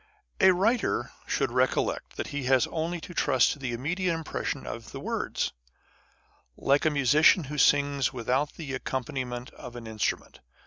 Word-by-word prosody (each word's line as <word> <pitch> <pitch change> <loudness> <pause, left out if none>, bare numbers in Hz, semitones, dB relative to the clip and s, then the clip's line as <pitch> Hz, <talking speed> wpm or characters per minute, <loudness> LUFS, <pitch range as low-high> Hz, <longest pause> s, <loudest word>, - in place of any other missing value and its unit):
A 190 - +7
writer 220 +7 +1 0.2
should - - 0
recollect - - 0
that - - -3
he 145 -3 -4
has 130 -1 +4
only 170 +2 -2
to 175 - -9
trust 130 -6 +3
to 145 - -6
the 130 -3 -3
immediate 165 +9 -1
impression 165 -1 -4
of - - -7
words, - - -2 1.0
like 140 +3 +2
a - - +5
musician 150 +4 +5
who 150 +1 -5
sings 140 -2 +3
without 130 +4 -1
the 145 -5 -6
accompaniment 125 -1 -4
of 125 - -10
an 120 -1 -8
in 110 -1 -9
strument. - - -2
140 Hz, 160 wpm, -28 LUFS, 125-160 Hz, 1.0 s, A